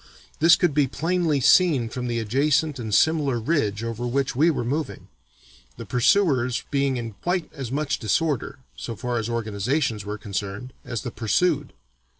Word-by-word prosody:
This 165 +2 +7
could 175 -5 +1
be 145 -1 +3
plainly 165 +1 0
seen 140 -3 +4
from 125 +2 -5
the 120 -1 -1
adjacent 140 +6 +1
and 110 -2 -5
similar 145 -1 +2
ridge 110 -6 0
over 115 +1 -3
which 135 +1 -1
we 155 +6 +4
were 145 -7 -1
moving, 145 +5 -4 0.7
the - - -7
pursuers 125 -2 +2
being 140 -2 +1
in 115 -1 -4
quite 180 -1 -2
as 135 -5 -6
much 150 +2 -1
disorder 140 +5 -1 0.2
(so 115 - -6
far 120 +2 -2
as 115 +1 -3
organizations 115 +1 -1
were 105 +1 -5
concerned) 100 +4 -5
as 120 -3 -5
the 120 - -4
pursued. 145 +7 0
130 Hz, 160 wpm, -24 LUFS, 115-150 Hz, 0.7 s, This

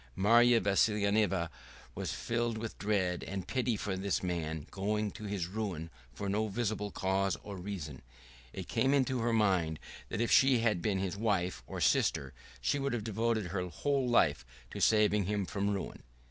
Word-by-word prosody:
Marya 115 +4 +5
Vassilyevna 100 -3 +2 0.4
was - - -3
filled 120 -1 -1
with 115 0 -6
dread 95 -4 0
and 95 -1 -5
pity 125 -4 0
for 100 -1 -2
this 95 0 -1
man 80 -4 -3
going 105 +2 -1
to 110 - -9
his 100 -4 -2
ruin 90 -4 -4 0.2
for 100 - -5
no 105 +2 0
visible 105 -1 -2
cause 95 0 0
or 100 - -7
reason, 90 -8 -6 0.5
and - - -6
it - - -18
came 135 +2 +2
into 130 -2 +1
her 115 +1 +1
mind 95 -8 +2 0.3
that - - -3
if 120 - +1
she 135 -1 +6
had 110 -6 +1
been 100 -1 0
his 95 -1 -2
wife 100 -5 0
or - - -5
sister 65 -1 +2 0.3
she 140 - 0
would 140 -1 -1
have 115 -3 -2
devoted 110 -2 -1
her 90 0 -2
whole 135 - 0
life 75 - +3 0.3
to - - -5
saving 105 -2 +4
him 100 0 -1
from 100 +1 -1
ruin. 100 -2 -4
100 Hz, 175 wpm, -32 LUFS, 95-115 Hz, 0.5 s, she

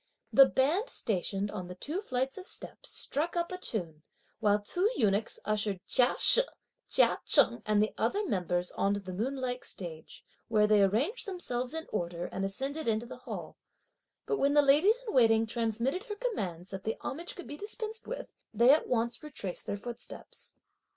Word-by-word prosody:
The 270 -1 +9
band 325 - +1
stationed 200 0 -1
on 185 -4 -5
the 180 - -8
two 310 - -4
flights 260 -6 -2
of 375 - -9
steps - - -7
struck 330 +5 -2
up 340 +1 -1
a 365 - -3
tune, 170 - -3 0.4
while 210 -2 +3
two 355 - 0
eunuchs 210 -1 +1
ushered 210 -2 0
Chia 250 -2 +4
She, - - +6 0.5
Chia - - +4
Cheng 235 -2 +5
and 210 0 +4
the 215 - -2
other 400 - +1
members 180 - -1
on 200 +1 +1
to - - -2
the 185 -2 -7
moonlike 255 +4 -2
stage, 160 -4 -7 0.2
where 215 -2 +4
they 210 -1 +5
arranged 250 - +1
themselves 255 -8 -2
in 320 0 -4
order 175 -3 -2
and 190 - -4
ascended 270 +10 -2
into 225 +1 +1
the 240 - -9
hall, - - -7 0.7
but 425 - 0
when 280 +1 +3
the 295 - +7
ladies 305 - +5
in - - -3
waiting 225 -3 +5
transmitted 235 - -1
her 420 -4 -5
commands 190 - -3
that 195 -1 -6
the 220 +2 -2
homage 335 +6 -5
could 360 - -8
be 290 - -7
dispensed 435 +4 -5
with, - - -6 0.2
they 235 +4 +7
at 305 - +3
once 235 -1 0
retraced 240 -12 -6
their 200 - -2
footsteps. 240 +3 -8
235 Hz, 180 wpm, -31 LUFS, 205-310 Hz, 0.7 s, The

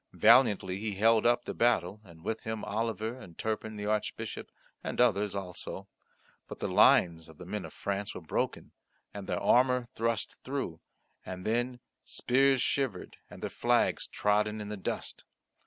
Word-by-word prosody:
Valiantly 100 -7 +5
he 105 -1 -3
held 115 +3 +4
up 120 0 +2
the - - -4
battle, 105 -4 +1
and 85 -4 -16
with 110 - -2
him 110 -1 -4
Oliver, 110 +1 -2
and 85 -8 -13
Turpin 110 0 -3
the 105 0 -5
Archbishop, 105 0 -3 0.3
and - - -4
others 105 -4 +3
also; 95 0 -6 0.6
but - - -8
the - - -2
lines 80 -2 +4
of 80 - -15
the 90 - -10
men 105 +2 -4
of - - -9
France 100 +1 -3
were - - -6
broken, 80 - -2 0.4
and 100 -2 -7
their - - -1
armour 125 -1 +3
thrust 115 -1 -1
through, 130 -12 -4 0.4
and 90 0 -7
then: 120 +2 -1 0.2
spears 135 0 +2
shivered, 130 -10 -2
and - - -11
their - - -1
flags - - +1
trodden 105 +1 +1
in 105 -1 -6
the 105 - -3
dust. 95 - -5
105 Hz, 165 wpm, -30 LUFS, 95-115 Hz, 0.6 s, Valiantly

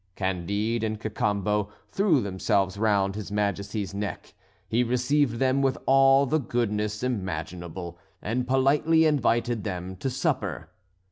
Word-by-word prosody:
Candide 100 +5 -1
and 110 -1 -2
Cacambo 105 -1 -1 0.2
threw 190 -9 +3
themselves 95 0 0
round 100 -2 +1
his 105 0 -6
Majesty's 100 -1 -2
neck. 100 0 -5 0.3
He 120 +2 +2
received 125 +1 +1
them 130 +2 +2
with 135 -1 +1
all 135 +1 +5
the 155 +4 +1
goodness 105 -4 -2
imaginable, 85 -5 -4 0.2
and 125 +4 -2
politely 145 +5 +3
invited 120 -6 +1
them 95 -2 -4
to 135 - -2
supper. 130 - -2
110 Hz, 125 wpm, -26 LUFS, 100-130 Hz, 0.3 s, all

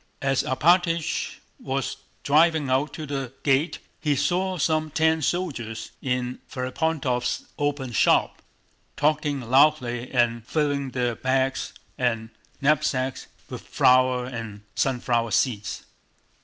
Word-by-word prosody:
As 135 -1 +2
Alpátych 170 +3 +1 0.2
was 135 0 -3 0.3
driving 155 -1 +3
out 135 +4 0
of 155 -2 -6
the 135 -3 -3
gate 140 +4 +2 0.2
he 150 -2 +1
saw 185 +6 0
some 155 0 +1
ten 160 +1 +2
soldiers 135 -10 -3
in 125 -1 -2
Ferapóntov's 130 -1 -1
open 145 -3 -1
shop, 115 - +2 0.6
talking 150 -1 +1
loudly 125 -1 +2
and 120 -2 +1
filling 145 -3 0
their 125 -2 -1
bags 130 +2 -1 0.3
and 115 -3 -1 0.3
knapsacks 135 -3 0 0.2
with - - -7
flour 125 0 +3
and 115 -5 -7
sunflower 120 -3 0
seeds. 110 -2 -1
135 Hz, 110 wpm, -25 LUFS, 125-155 Hz, 0.6 s, driving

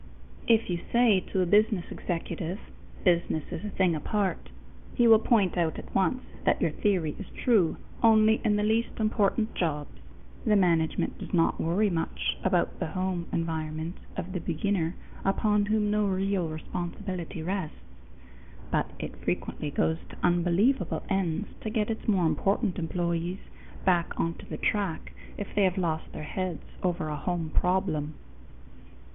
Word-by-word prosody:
If 230 -1 +4
you 175 -2 -1
say 235 -5 +5
to 190 - +2
a - - +3
business 205 0 +3
executive, 175 +1 -3 0.4
"Business 170 -4 +2
is 165 - -5
a 210 - -3
thing 185 -4 +2
apart," 195 +5 -1 0.5
he 240 -2 +5
will 225 -1 +8
point 205 -6 +2
out 160 -2 +1
at - - -9
once 255 +7 +1 0.2
that - - +3
your 165 - +1
theory 175 -4 +1
is 200 - -6
true 210 -10 +2 0.2
only 220 -1 +5
in 210 -3 +3
the 210 - +1
least 225 +3 0
important 215 0 +1
jobs. 150 -4 -2 0.5
The 215 -4 +3
management 170 -5 +2
does - - -3
not 165 - +2
worry 195 +5 +2
much 165 -1 -1
about 185 -2 +1
the 175 - -1
home 185 +1 -2
environment 160 0 -3 0.2
of 180 - -4
the 180 - -1
beginner 170 +1 -1 0.3
upon 205 +1 +2
whom 210 -1 +2
no 210 -1 +2
real 190 -2 0
responsibility 175 +2 -5
rests, 185 -2 -3 0.9
but - - +1
it - - -6
frequently 150 - -2
goes 160 +2 +1
to - - -11
unbelievable 180 +9 +2
ends 195 0 0
to 220 - -3
get 215 0 0
its 220 - -5
more 190 -5 +3
important 195 +4 +1
employees 170 +1 -1 0.5
back 175 -3 +2
onto 165 0 -2
the - - -5
track 200 -6 -1 0.3
if 205 - -6
they 205 - +2
have 185 -1 +2
lost 160 -3 -1
their - - -7
heads 180 +1 -3 0.2
over 175 -3 0
a 150 - -2
home 165 0 -2
problem. 170 -5 +1
185 Hz, 155 wpm, -28 LUFS, 165-210 Hz, 0.9 s, will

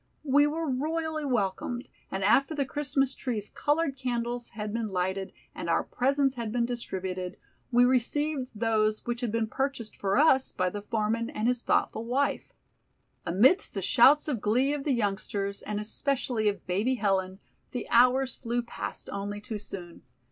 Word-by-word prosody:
We 290 +1 +5
were 320 +2 -2
royally 310 +3 -1
welcomed, 240 +1 -1 0.2
and 190 0 -3
after 275 +9 +3
the 280 -2 0
Christmas 270 -1 0
tree's 225 -7 -3
colored 295 -1 0
candles 240 -2 -3
had 210 -1 -3
been 230 -1 -1
lighted 190 0 -2 0.2
and - - -5
our - - +2
presents 270 +1 +1
had 235 -4 -4
been 240 0 +1
distributed, 190 -6 -4 0.3
we 245 0 +6
received 260 +2 +1
those 215 -1 +1
which 240 +1 -3
had 240 -3 -1
been 230 0 +1
purchased 265 -1 -3
for 195 +2 0
us 270 -3 +4
by 185 0 0
the 205 - -5
foreman 225 +2 -1
and 215 - -2
his 245 -1 +1
thoughtful 225 - +1
wife. 260 +4 -1 0.8
Amidst 255 - +4
the 195 - -2
shouts 285 - +6
of 255 -8 -1
glee 250 +7 +2
of 290 -2 -4
the 285 - +2
youngsters, 200 -2 -2
and 210 -1 -3
especially 225 0 0
of 200 - -5
Baby 205 +8 +1
Helen, 190 -4 0 0.3
the 245 - -5
hours 255 +2 +4
flew 240 -1 -2
past 235 - -6
only 200 +1 -4
too 210 0 -6
soon. 175 -4 -8
235 Hz, 165 wpm, -28 LUFS, 210-270 Hz, 0.8 s, we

